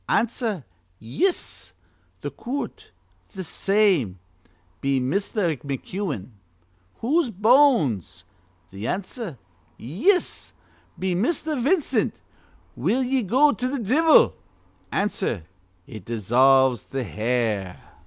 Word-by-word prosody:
Answer: 225 - 0 0.3
'Yis.' 330 - -2 0.5
Th' - - -5
coort: 270 +4 -5 0.5
'Th' 190 -1 -5
same.' 190 - +2 0.6
Be 135 -1 +1
Misther 170 - 0
McEwen: 140 - -4 0.7
'Whose 290 +4 +2
bones?' 215 - +3 0.5
Answer: 180 - -4 0.4
'Yis.' 230 - 0 0.4
Be 185 -1 -1
Misther 305 - 0
Vincent: 305 +5 +1 0.6
'Will 260 +2 +1
ye 260 +1 +1
go 260 +8 +4
to 250 -2 -2
th' 235 - -4
divvle?' 315 +7 +5 0.6
Answer: 195 - -1 0.4
'It 110 -4 -10
dissolves 125 +3 +3
th' 135 -2 -4
hair.' 110 -4 -1
190 Hz, 90 wpm, -24 LUFS, -, 0.7 s, divvle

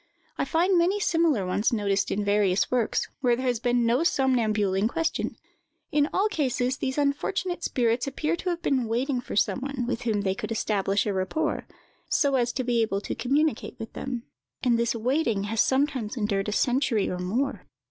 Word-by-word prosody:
I - - -1
find 350 +2 +2
many 370 +4 +2
similar 330 - +2
ones 190 +4 +1
noticed 200 -3 0
in 205 0 -1
various 200 -3 +2
works, 245 -3 +1
where 245 -3 +3
there 255 +2 -4
has 245 -3 +1
been 245 0 +1
no 235 +2 +3
somnambule 230 - +2
in 195 +3 +2
question. 330 +6 -2 0.5
In 295 0 +2
all 400 +3 +2
cases, 265 - 0
these 265 0 -3
unfortunate 345 +5 -1
spirits 240 +1 +1
appear 305 +4 -1
to 365 - -3
have 345 -1 -3
been 260 -4 +1
waiting 250 +3 0
for - - -7
some 210 - +2
one 270 -2 -3
with 245 -1 -2
whom 220 -4 0
they 190 -1 0
could 195 - -6
establish 200 -3 0
a 205 - 0
rapport, 300 +12 -1 0.4
so 280 -2 +2
as 245 -2 +2
to 255 - -2
be 240 -1 +1
able 205 -3 0
to - - -4
communicate 270 +2 0
with 225 -1 -8
them; 250 -3 -4 0.4
and 240 -3 +3
this 235 0 +1
waiting 230 -3 0
has 210 +1 +1
sometimes 265 -4 0
endured 210 -2 0
a - - -2
century 245 -1 +1
or 180 - -3
more. 230 +10 -2
245 Hz, 190 wpm, -26 LUFS, 215-280 Hz, 0.5 s, where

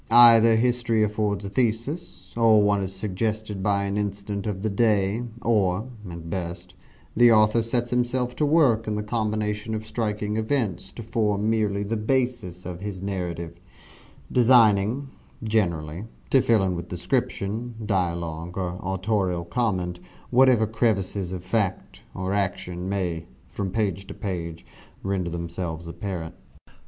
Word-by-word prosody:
Either 115 -1 +8
history 115 -1 +2
affords 105 -1 -1
a - - -4
thesis 115 - -2
or 110 -2 +5
one 100 -1 +2
is 95 -1 -3
suggested 105 +1 -3
by 100 0 +1
an 100 +1 -2
incident 100 0 -3
of 100 -2 -3
the 110 - +1
day 105 0 +2 0.2
or, 105 +1 +1 0.2
at 85 -1 -8
best, 85 0 -5 0.4
the 120 +1 +7
author 110 +1 +5
sets 120 +1 -1
himself 125 0 0
to - - 0
work 145 -8 +3
in 105 - -1
the 105 - -2
combination 105 0 -2
of 110 0 -5
striking 105 -2 -2
events 110 - -1
to 115 - -8
form 105 -2 0
merely 105 -2 +1
the 110 +3 -2
basis 115 -6 -1
of 90 0 -6
his 100 -2 -5
narrative 85 -3 -4 0.7
designing, 120 0 +4 0.4
generally, 85 -5 -1 0.3
to 135 - +6
fill 115 -5 +3
in 95 -1 0
with 85 - -5
description, 110 +4 -2
dialogue, 85 -3 -2
or 90 -1 -3
autorial 95 -2 -1
comment, 90 -3 -1 0.3
whatever 125 -3 +5
crevices 105 -4 0
of 90 -2 -5
fact, 105 -4 -2
or 95 +1 -2
action, 95 -2 -2
may, 90 -4 -2 0.2
from 100 -2 -4
page 100 -2 -1
to - - -8
page, 85 -4 -5 0.4
render 95 -3 -1
themselves 85 -1 -4
apparent. 85 -2 -5
105 Hz, 140 wpm, -25 LUFS, 90-115 Hz, 0.7 s, Either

